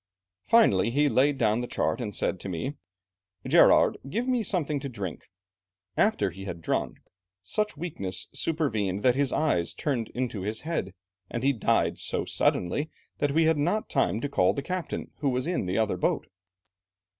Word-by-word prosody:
Finally, 165 - +4
he 145 +5 +2
laid 140 +1 +3
down 110 -1 +2
the 120 - -4
chart, 120 - -1
and 105 -4 -4
said 95 - -1
to 100 - -6
me, 90 - -3 0.7
'Gerard, - - +5
give 230 - -2
me 250 -2 +2
something 160 -8 -1
to 140 0 -5
drink.' 100 - -6 0.7
After 215 - +2
he 95 +3 -9
had 90 -3 -5
drunk, 80 - -2 0.5
such 210 - -1
weakness 95 - -3
supervened 110 - -1
that 125 +1 +4
his 140 -1 +1
eyes 90 - +1
turned 125 -7 -1
in 125 +1 0
his 105 0 -4
head, 150 - -3 0.3
and 120 - -4
he 140 +1 +4
died 115 - +1
so - - -1
suddenly 145 - 0 0.3
that 145 -1 +1
we 165 +2 +4
had 160 -1 +3
not 180 +9 0
time 100 +5 +1
to 145 - -1
call 90 -9 +2
the 140 - -3
captain, 180 +2 -4
who 145 - +1
was 125 0 -1
in 175 - -1
the 90 - -1
other 110 -4 +1
boat. - - 0
130 Hz, 175 wpm, -27 LUFS, 100-155 Hz, 0.7 s, Gerard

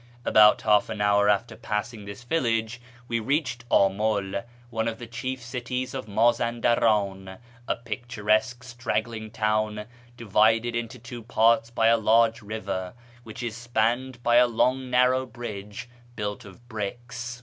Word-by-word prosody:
About 105 0 +6
half 105 -1 +3
an 110 -1 -5
hour 105 0 +3
after 105 +3 +1
passing 105 0 -4
this 100 +4 -9
village 120 -5 -1 0.3
we 115 -1 -1
reached 125 -1 -2
Amul, 100 +2 +1 0.3
oue 115 - -5
of 110 - -6
the 120 - -8
chief 125 +3 -5
cities 125 +1 -4
of 130 -5 -5
Mazaudaran, 110 -3 +1 0.3
a - - +1
picturesque 120 0 -1
straggling 115 -2 -3
town 105 0 -1 0.3
divided 110 +2 +2
into 120 +2 -4
two 120 0 -9
parts 115 0 +3
by 115 -1 0
a 115 +1 +5
large 115 +1 +3
river, 100 -3 -5 0.3
wliich 115 +3 -7
is 115 -2 -4
spanned 120 +2 -1
by 120 0 +4
a 125 0 +6
long 125 +2 0
narrow 125 +1 +3
bridge 105 -3 -7 0.3
built 105 -2 -4
of 100 +5 -15
bricks. 120 +2 -6
115 Hz, 140 wpm, -26 LUFS, 105-120 Hz, 0.3 s, About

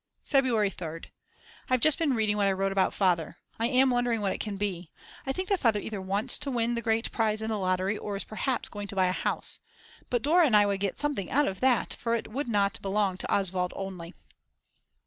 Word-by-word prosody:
February 240 -8 +2
3rd. 165 -3 -8 0.6
I've 255 0 +3
just 310 +4 +3
been 295 -6 +1
reading 215 -2 +1
what 205 -1 +2
I 195 - +2
wrote 195 +1 -1
about 195 -1 +2
Father. 175 -4 0 0.2
I 230 - +2
am 260 +1 +3
wondering 245 -2 +1
what 200 -2 0
it - - -6
can 210 -2 -4
be. 185 -5 -3 0.4
I - - +1
think 370 +6 -3
that 395 -2 +2
Father 220 -4 +2
either 205 -2 -5
wants 195 +3 +4
to 295 - -3
win 240 -2 0
the 235 - -2
great 225 0 0
prize 215 -2 0
in 220 0 -3
the 215 -2 -1
lottery 185 +2 0
or 205 -1 -4
is - - -4
perhaps 250 +4 -2
going 205 -1 -7
to 200 - -8
buy 190 -1 +3
a 180 - +1
house. - - -2 0.5
But 245 -2 0
Dora 325 +3 +5
and 215 -5 +5
I 205 - +5
would 200 -1 -1
get 200 -1 -2
something 290 -10 -2
out 290 +2 +2
of 190 - -4
that, 255 -2 +2
for 230 0 -1
it 230 - -4
would 275 +4 -3
not 200 -3 0
belong 195 -1 0
to - - -5
Oswald 185 -2 0
only. 185 -3 -7
210 Hz, 230 wpm, -28 LUFS, 195-245 Hz, 0.6 s, Dora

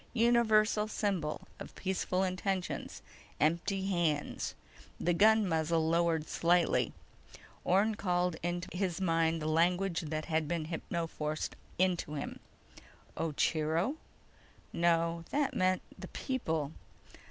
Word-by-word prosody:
Universal 220 -3 +4
symbol 190 -8 -2
of - - -9
peaceful 190 0 -1
intentions: 185 0 -2 0.4
empty 180 +5 +1
hands. 170 -6 -1 0.4
The 175 - +2
gun 215 +3 +5
muzzle 160 -1 +1
lowered 165 -2 +2
slightly. 170 0 +2 0.7
Orne 200 +5 +3
called 180 -4 0
into 175 +1 -2
his 185 -1 -1
mind 165 -3 +1
the - - -1
language 175 +3 +2
that 155 -1 -3
had 160 -2 0
been 165 -1 -1
hypnoforced 160 -2 -3 0.3
into 180 -4 +1
him. 140 - -5 0.8
_Ocheero? 165 - 0 0.8
No. 170 0 +2
That 285 -1 0
means 185 0 +2 0.2
'The - - -7
People. 160 - -2
175 Hz, 105 wpm, -32 LUFS, 160-195 Hz, 0.8 s, gun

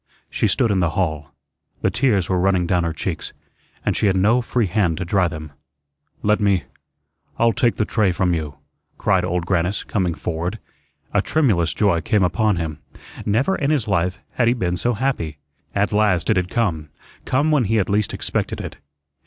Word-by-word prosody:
She - - +1
stood 120 -5 +2
in 95 - +2
the 85 -2 +2
hall. 80 -5 -1 0.5
The - - +2
tears 110 -9 +2
were 95 -1 +1
running 95 -1 +2
down 90 0 +1
her 85 - -1
cheeks, - - -4 0.5
and - - +1
she - - +2
had 95 - +2
no 110 +6 +3
free 120 -1 0
hand 90 -4 +1
to 90 - -3
dry 95 0 +2
them. 80 -3 -7 0.7
"Let 105 +1 +3
me 100 -4 +2 0.7
I'll 115 0 +3
take 120 +3 +2
the 110 - 0
tray 105 -4 +2
from 90 0 +1
you," 75 -4 -3 0.4
cried 95 -2 +2
Old 90 -1 -1
Grannis, 90 +2 0
coming 90 -5 -1
forward. 85 +6 -3 0.6
A - - +3
tremulous 105 - +2
joy 95 -6 +2
came 100 +5 +2
upon 100 +4 +2
him. 80 -3 -4 0.5
Never 130 - +2
in 140 - -1
his 140 -8 +1
life 90 -2 0
had 120 - +1
he 120 - +3
been 90 -7 -1
so 120 +6 0
happy. 105 - -2 0.4
At 100 +1 +1
last 105 -3 +2
it - - +3
had 90 -1 0
come 85 -11 -1 0.4
come 145 +5 +1
when 145 -6 +3
he 110 +3 +1
had 105 -4 +2
least 105 0 +1
expected - - -2
it. - - -7
95 Hz, 190 wpm, -21 LUFS, 85-110 Hz, 0.7 s, no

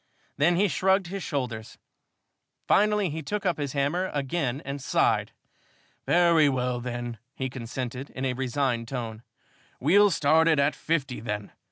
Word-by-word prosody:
Then 160 +5 +3
he 200 +4 +3
shrugged 190 +1 +2
his 195 +1 -4
shoulders. 125 -8 -4 0.9
Finally, 210 -3 +3
he 160 +2 -4
took 205 +7 -4
up 180 -4 +1
his 140 -2 -3
hammer 150 +7 0
again 140 -2 -1
and 140 +1 -5
sighed. - - +1 0.8
"Very 170 -4 +5
well, 125 -2 -1
then," 120 -2 -5 0.2
he 130 -1 -3
consented, 130 +2 -5
in 130 - -5
a 130 - 0
resigned 125 -2 -1
tone, 115 -4 -5 0.6
"we'll 200 +9 +5
start 160 -1 +3
it 160 -2 +4
at 140 +1 +3
fifty, 140 -6 -2
then. 105 -2 -4
140 Hz, 150 wpm, -27 LUFS, 125-170 Hz, 0.9 s, Very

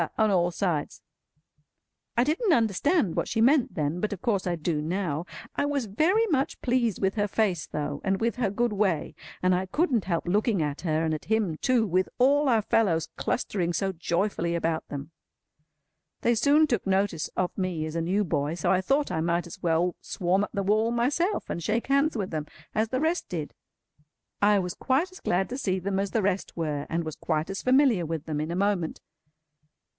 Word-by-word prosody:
on 220 -1 +3
all 175 -2 +3
sides. 170 -4 -2 1.1
I 240 - +5
didn't 330 - +2
understand 225 - +2
what - - 0
she - - -2
meant 260 +3 +3
then, 150 +2 -1
but 215 - -1
of 200 - -4
course 200 -5 0
I 175 - 0
do 160 -1 -1
now. 170 -1 -2 0.3
I - - +1
was 285 -4 -1
very 325 - +2
much 285 -10 0
pleased 240 -5 +1
with 190 -1 +1
her 205 -1 0
face 190 -6 0
though, 145 -1 -4
and 195 0 0
with 230 +2 0
her 235 -5 +1
good 235 +3 0
way, 195 -6 0 0.3
and 185 0 +4
I 185 +1 0
couldn't 255 - +1
help 170 -2 -1
looking 210 +2 +2
at 150 -2 -2
her—and 160 -1 0
at 155 - -5
him 215 -7 +1
too—with 215 -7 +1
all 280 +3 +4
our 225 -3 +3
fellows 165 -8 +1
clustering 180 -7 -1
so 195 +2 0
joyfully 170 0 -1
about 165 -1 -1
them. 145 +2 -7 1.1
They 235 - +3
soon 285 +7 +4
took 235 -9 -1
notice 190 -5 0
of 180 -1 0
me 180 -5 -2
as 155 +1 -6
a 165 - 0
new 190 +5 +1
boy, 150 -3 -1
so 170 - 0
I 185 -1 +3
thought 275 +8 +1
I 160 - -1
might 170 +1 0
as 170 - -10
well 170 +1 +1
swarm 185 +2 0
up - - -4
the 200 - -2
wall 215 +3 +2
myself, 285 - 0
and 170 - -4
shake 220 +7 0
hands 280 0 +2
with 195 -3 -3
them 155 -2 -3 0.3
as 220 +1 +1
the 255 - -1
rest 325 +3 0
did. 160 -4 -4 0.9
I 205 0 +5
was 180 -2 -1
quite 285 +8 0
as 370 - -12
glad 185 +2 0
to 255 +2 -4
see 190 -7 0
them 190 +1 -2
as 200 0 -1
the 220 0 0
rest 190 -2 -1
were, 150 -3 -2
and 165 +1 -1
was 155 -2 -5
quite 155 +4 -2
as 195 - -4
familiar 255 -7 +4
with 160 -1 -4
them 150 -2 -2
in 155 - -3
a 170 - -2
moment. 190 -4 0
195 Hz, 200 wpm, -27 LUFS, 170-235 Hz, 1.1 s, I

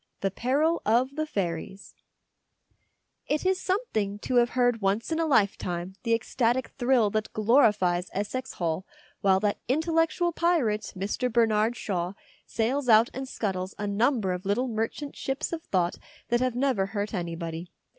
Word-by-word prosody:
THE 195 - 0
PERIL 290 - +1
OF 250 +5 +2
THE 310 0 -1
FAIRIES 190 - -4 1.3
IT 300 +4 -1
is 375 0 +2
something 220 - -1
to 250 +4 -1
have 240 0 +5
heard 245 -2 +3
once 200 +8 0
in 320 - 0
a 325 - +1
lifetime 190 - +1
the 230 -1 +2
ecstatic 240 +2 0
thrill 240 -4 +2
that 215 0 -2
glorifies 210 -6 +3
Essex 255 +6 -3
Hall 170 0 -2 0.4
while 190 -1 +4
that 205 -1 0
intellectual 325 +5 +1
pirate 310 -12 +1
Mr. 210 +6 -1
Bernard 225 0 +3
Shaw 180 -2 -2 0.3
sails 250 +4 -1
out 225 +2 +6
and 265 +1 -5
scuttles 190 -5 -3
a 205 - -3
number 210 0 +1
of 180 0 -5
little 205 +6 0
merchant 230 +5 -3
ships 270 +4 -3
of 330 - -3
thought 180 -2 0 0.3
that 240 - +3
have 255 -1 0
never 250 -7 +1
hurt 205 +1 -3
anybody. 170 -2 -4
225 Hz, 155 wpm, -27 LUFS, 195-260 Hz, 1.3 s, out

